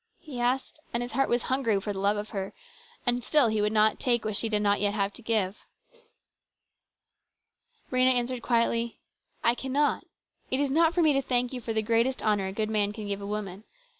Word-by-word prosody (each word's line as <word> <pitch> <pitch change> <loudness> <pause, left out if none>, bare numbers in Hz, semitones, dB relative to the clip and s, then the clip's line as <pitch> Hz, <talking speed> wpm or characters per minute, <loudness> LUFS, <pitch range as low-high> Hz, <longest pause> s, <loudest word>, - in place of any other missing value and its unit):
he 295 -7 -8
asked; 255 +4 -1 0.2
and 240 - 0
his 245 - -6
heart 270 +3 +1
was 240 0 +1
hungry 245 -6 +1
for 205 +1 -4
the 190 - -5
love 200 +2 +2
of 210 +1 -5
her, 195 -3 -5 0.5
and 245 0 +1
still 290 -4 +3
he 215 -1 0
would 210 0 +1
not 215 0 +3
take 240 -3 +1
what 215 -1 -2
she 225 - +1
did 210 -1 +1
not 205 0 +2
yet 205 0 +1
have 200 -1 0
to - - -8
give. 215 -4 0 2.3
Rhena 255 0 +4
answered 245 0 -1
quietly: 235 -1 +1 0.3
" - - -41
I 235 - +5
cannot. 270 +4 0 0.5
It 260 - 0
is 285 -1 0
not 325 +3 +3
for 350 - +3
me 310 -2 +5
to 275 - +2
thank 250 -1 0
you 250 - -5
for 230 - -4
the 220 -1 0
greatest 230 +4 +1
honour 205 -3 +1
a - - -4
good 215 +2 -2
man 205 -1 +1
can 215 -1 -7
give 200 0 -3
a 200 - -6
woman. 205 -1 -5
230 Hz, 220 wpm, -28 LUFS, 210-255 Hz, 2.3 s, I